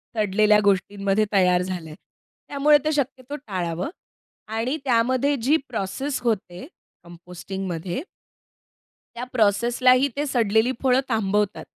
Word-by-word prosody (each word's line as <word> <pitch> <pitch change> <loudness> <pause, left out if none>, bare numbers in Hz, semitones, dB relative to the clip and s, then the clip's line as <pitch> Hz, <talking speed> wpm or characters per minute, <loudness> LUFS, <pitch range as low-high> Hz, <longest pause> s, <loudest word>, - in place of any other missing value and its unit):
सडलेल्या 210 0 +3
गोष्टींमध्ये 200 +1 +1
तयार 180 -2 +4
झालंय. 175 -4 -5 0.5
त्यामुळे 295 +1 +4
ते 310 - +2
शक्यतो 275 -1 -3
टाळावं. 185 - -4 0.6
आणि 225 +7 -2
त्यामध्ये 255 +4 +2
जी 285 +7 +3
प्रोसेस 250 +5 -3
होते 215 -1 -3 0.4
कंपोस्टिंगमध्ये 175 +2 -6 1.1
त्या 240 - -5
प्रोसेसलाही 245 +4 +3
ते 290 +1 -1
सडलेली 230 -3 +2
फळं 255 0 +4
थांबवतात. 210 -2 0
220 Hz, 100 wpm, -23 LUFS, 190-255 Hz, 1.1 s, तयार